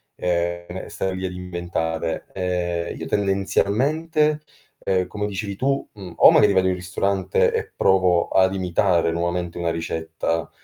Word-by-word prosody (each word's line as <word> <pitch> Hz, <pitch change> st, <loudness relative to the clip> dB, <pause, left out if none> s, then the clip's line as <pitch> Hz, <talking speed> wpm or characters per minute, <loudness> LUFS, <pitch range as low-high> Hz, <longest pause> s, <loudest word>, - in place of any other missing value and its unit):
ehm, 85 Hz, +1 st, -2 dB
stare 95 Hz, -1 st, -3 dB
lì 95 Hz, 0 st, -4 dB
ad 90 Hz, -, -3 dB
inventare. 85 Hz, -2 st, -3 dB
Ehm, 90 Hz, -2 st, -2 dB
io -, -, -6 dB
tendenzialmente, 140 Hz, +11 st, +1 dB, 0.4 s
uhm, 95 Hz, -2 st, +1 dB
come 105 Hz, 0 st, -3 dB
dicevi 100 Hz, 0 st, -4 dB
tu, 135 Hz, +5 st, -1 dB
mhmm, 95 Hz, -5 st, -10 dB
o -, -, +8 dB
magari 105 Hz, -, +5 dB
vado 95 Hz, -1 st, +3 dB
in 95 Hz, -, +2 dB
ristorante, 95 Hz, +1 st, 0 dB
e -, -, -2 dB
provo 90 Hz, -2 st, +3 dB
ad 95 Hz, 0 st, +3 dB
imitare 90 Hz, -2 st, +1 dB
nuovamente 85 Hz, 0 st, -2 dB
una 85 Hz, -1 st, -1 dB
ricetta, 80 Hz, 0 st, -3 dB
90 Hz, 140 wpm, -22 LUFS, 85-100 Hz, 0.4 s, o